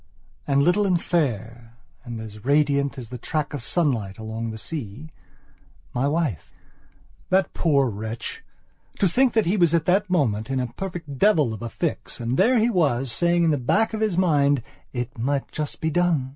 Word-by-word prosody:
And, 140 0 +3
little 195 +5 +3
and 180 -2 +2
fair, 120 - -2 0.3
and 120 -3 -6
as 105 -1 -9
radiant 140 0 +2
as 120 -4 -7
the 125 -1 -7
track 150 +4 -2
of 145 - -4
sunlight 115 - 0
along 110 +1 -5
the 110 - -6
seamy 140 +2 -7 0.8
wife. 140 - -1 0.8
That 190 0 +2
poor 140 -5 +2
wretch! 110 +1 -5 0.5
to 195 - +3
think 250 +7 +3
that 220 - +3
he 185 +5 +1
was 170 -3 +4
at 165 -1 +1
that 195 +2 +2
moment 120 - +1
in 135 -1 0
a 125 -2 -3
perfect 170 -7 -6
devil 155 - +4
of 110 - -8
a 120 - -4
fix, 165 +2 -3
and 120 +1 -1
there 240 - +4
he 230 +2 +3
was, 135 - +1
saying 170 +5 +2
at 160 - +3
the 150 - +2
back 220 - +1
of 220 - -3
his 210 -5 +1
mind: 145 -7 +3 0.3
"It 125 -1 -5
might 135 +3 -1
just 150 -2 -4
be 160 - 0
done." 165 -6 +1
145 Hz, 185 wpm, -24 LUFS, 120-175 Hz, 0.8 s, was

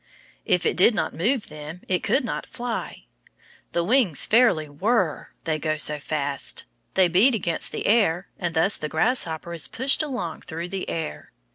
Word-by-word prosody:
If 180 - +2
it - - +1
did 210 +5 +5
not - - -1
move 230 +7 0
them, 155 +3 -9
it 180 -1 0
could 265 -2 +1
not 225 - -4
fly. 240 -2 -5 0.7
The 170 - +1
wings 210 - +3
fairly 220 -10 +3
whirr, 185 +3 0 0.2
they 155 -1 -1
go 155 0 -1
so 150 0 +3
fast. 140 -2 -2 0.3
They 185 -1 +5
beat 200 +9 +4
against 170 -5 0
the - - -4
air, 200 -5 +2
and 175 -3 -3
thus 180 +6 +3
the 150 - -5
grasshopper 170 -3 -1
is 155 -5 0
pushed 260 - +3
along 245 - -4
through 165 +2 -6
the 190 0 -4
air. 160 -2 -5
175 Hz, 170 wpm, -24 LUFS, 155-225 Hz, 0.7 s, did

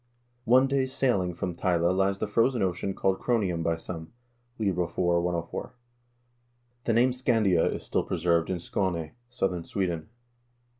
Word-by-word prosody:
One 130 +3 +6
day's 135 -1 0
sailing 100 -11 +1
from 90 0 -3
Tyle 85 0 +1
lies 95 +1 +1
the - - -1
frozen 115 +2 +2
ocean 95 +1 -1
called 95 0 +1
Cro 120 -1 +1
nium 90 -5 -1
by 85 0 +1
some." 80 +1 -8 0.2
— 120 +1 -42
Lib. 100 -5 0
IV., 90 -1 -2
104. 85 +2 -1 1.1
The 115 - +2
name 120 +3 +4
Scandia 115 -9 +2
is - - -5
still - - 0
preserved 85 -1 +1
in 90 -2 -1
Skane, 85 -3 -2 0.2
southern 95 -8 -1
Sweden. 85 -3 -2
95 Hz, 155 wpm, -28 LUFS, 85-115 Hz, 1.1 s, One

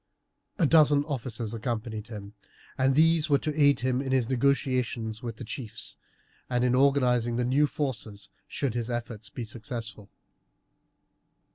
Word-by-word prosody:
A 170 - +3
dozen 145 -2 +5
officers 120 -6 -4
accompanied 110 -2 -4
him; 105 -3 -8 0.6
these 160 +3 +4
were 140 - +5
to 155 +2 -3
aid 145 -3 +4
him 130 0 +1
in 135 -1 -3
his 130 -2 +1
negotiations 125 -4 0
with 115 -2 -5
the 120 - -8
chiefs, 115 -1 -6 0.5
and 125 -1 +1
in 125 0 +2
organizing 125 -3 +3
the 120 0 0
new 140 +4 +3
forces, 110 -9 -5 0.2
should 135 -5 -2
his 120 0 -3
efforts 115 -3 -4
be 120 - -6
successful. 110 -1 -7
125 Hz, 140 wpm, -28 LUFS, 115-140 Hz, 0.6 s, dozen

